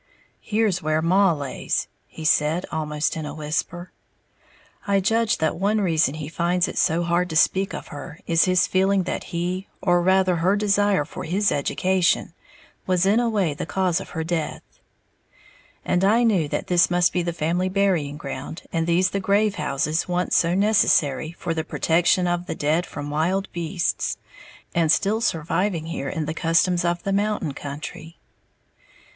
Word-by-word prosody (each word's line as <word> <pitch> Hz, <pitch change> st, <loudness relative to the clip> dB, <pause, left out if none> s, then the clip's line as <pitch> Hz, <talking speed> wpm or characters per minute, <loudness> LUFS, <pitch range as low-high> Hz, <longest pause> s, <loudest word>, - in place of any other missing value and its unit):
"Here's 210 Hz, -4 st, 0 dB
where 155 Hz, -1 st, 0 dB
Maw 185 Hz, +4 st, +3 dB
lays," 145 Hz, -4 st, -3 dB, 0.2 s
he 160 Hz, -, -9 dB
said, 155 Hz, +3 st, +2 dB
almost 150 Hz, -1 st, -2 dB
in 155 Hz, -2 st, -4 dB
a 145 Hz, -, -7 dB
whisper 165 Hz, +4 st, -4 dB, 1.0 s
(I 200 Hz, -1 st, +3 dB
judge 225 Hz, +3 st, +1 dB
that 160 Hz, +1 st, -1 dB
one 205 Hz, +3 st, +1 dB
reason 165 Hz, -7 st, +1 dB
he 155 Hz, -2 st, -6 dB
finds 175 Hz, +2 st, 0 dB
it -, -, -3 dB
so 165 Hz, +2 st, +2 dB
hard 175 Hz, +1 st, 0 dB
to 160 Hz, -, -5 dB
speak 190 Hz, +5 st, +3 dB
of -, -, -8 dB
her 150 Hz, +2 st, -9 dB
is 165 Hz, 0 st, +3 dB
his 185 Hz, -1 st, +3 dB
feeling 190 Hz, 0 st, +2 dB
that -, -, -4 dB
he, 180 Hz, +2 st, -3 dB
or 175 Hz, -2 st, +2 dB
rather, 185 Hz, 0 st, +3 dB
her 180 Hz, +4 st, +2 dB
desire 205 Hz, -4 st, +2 dB
for -, -, -8 dB
his 195 Hz, +5 st, +1 dB
education, 180 Hz, +5 st, +1 dB, 0.5 s
was 185 Hz, 0 st, +2 dB
in 205 Hz, +4 st, +3 dB
a 240 Hz, -1 st, +1 dB
way 195 Hz, -8 st, 0 dB
the 145 Hz, -, -6 dB
cause 185 Hz, -1 st, 0 dB
of -, -, -10 dB
her 160 Hz, -, -1 dB
death), 165 Hz, -1 st, -3 dB, 1.2 s
and 180 Hz, -, +1 dB
I 220 Hz, +5 st, +4 dB
knew 195 Hz, -10 st, +2 dB
that -, -, -3 dB
this 175 Hz, -1 st, +3 dB
must 175 Hz, 0 st, +2 dB
be 180 Hz, -, +1 dB
the 170 Hz, 0 st, -2 dB
family 170 Hz, +3 st, -1 dB
burying 185 Hz, -7 st, 0 dB
ground, 150 Hz, +3 st, -7 dB
and 165 Hz, -1 st, 0 dB
these 180 Hz, +2 st, +2 dB
the 200 Hz, -, -1 dB
grave 200 Hz, +2 st, +2 dB
houses 150 Hz, +4 st, -1 dB
once 180 Hz, 0 st, 0 dB
so 170 Hz, 0 st, +3 dB
necessary 175 Hz, -8 st, +2 dB
for 170 Hz, -1 st, -4 dB
the 160 Hz, -1 st, -2 dB
protection 175 Hz, +3 st, +2 dB
of 175 Hz, 0 st, -1 dB
the -, -, -3 dB
dead 155 Hz, +4 st, 0 dB
from 145 Hz, 0 st, -6 dB
wild 180 Hz, +6 st, -1 dB
beasts, 170 Hz, +1 st, -2 dB, 0.6 s
and 165 Hz, -3 st, +2 dB
still 210 Hz, +6 st, +1 dB
surviving 170 Hz, -2 st, -1 dB
here 140 Hz, -4 st, -4 dB
in 155 Hz, +2 st, -3 dB
the 155 Hz, -, -3 dB
customs 170 Hz, +2 st, +2 dB
of 175 Hz, 0 st, -1 dB
the 195 Hz, -, -1 dB
mountain 205 Hz, -7 st, -1 dB
country. 150 Hz, +3 st, -8 dB
175 Hz, 175 wpm, -23 LUFS, 160-190 Hz, 1.2 s, I